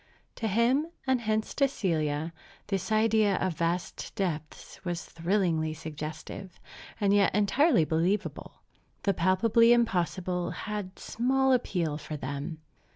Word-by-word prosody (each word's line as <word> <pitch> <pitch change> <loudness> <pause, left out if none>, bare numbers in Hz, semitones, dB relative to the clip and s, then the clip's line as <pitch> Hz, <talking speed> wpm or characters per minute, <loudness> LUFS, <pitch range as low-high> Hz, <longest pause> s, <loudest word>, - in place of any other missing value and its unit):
To 225 - -1
him, 235 +9 +2 0.2
and 260 -2 +2
hence 220 -1 -1
to 275 - +3
Celia, 160 - -1 0.3
this 195 +1 -2
idea 215 -2 +3
of 185 -2 0
vast 170 +2 -2
depths 160 -5 -4
was 175 -2 -3
thrillingly 165 -3 0
suggestive, 155 +4 -7 0.4
and 200 -2 +3
yet 200 -2 +4
entirely 210 - +4
believable. 175 +6 -1 0.4
The 200 - +2
palpably 220 +7 +4
impossible 180 -5 0 0.2
had 210 -3 -4
small 265 +3 +1
appeal 170 -11 0
for 155 0 -6
them. 140 +4 -5
190 Hz, 120 wpm, -29 LUFS, 165-220 Hz, 0.4 s, yet